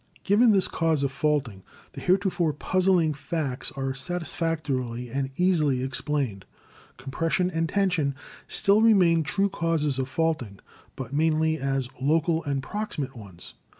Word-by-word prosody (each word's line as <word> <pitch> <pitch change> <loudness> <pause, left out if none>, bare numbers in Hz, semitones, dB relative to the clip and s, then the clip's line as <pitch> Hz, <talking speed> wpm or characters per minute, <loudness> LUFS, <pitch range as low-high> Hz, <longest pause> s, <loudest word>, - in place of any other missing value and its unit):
Given 215 +5 +4
this 195 -3 +3
cause 160 -3 0
of 140 - 0
faulting, 135 -8 -1 0.3
the - - -9
heretofore 180 -4 +1
puzzling 180 0 +2
facts 140 -2 -3
are 135 -2 -3
satisfactorily 135 -6 -3
and 135 +1 -2
easily 155 -8 +2
explained. 130 -6 -2 0.5
Compression 165 +8 -1
and 165 -1 -1
tension 180 -9 +1 0.3
still 200 +2 +3
remain 185 -7 +5
true 195 +6 +1
causes 160 -7 -1
of 130 0 -2
faulting, 155 -11 -1 0.4
but 130 0 -7
mainly 160 +1 +1
as 135 -1 -1
local 160 +3 +1
and 140 -2 -2
proximate 150 -8 -4
ones. 100 -6 -11
155 Hz, 130 wpm, -26 LUFS, 135-170 Hz, 0.5 s, remain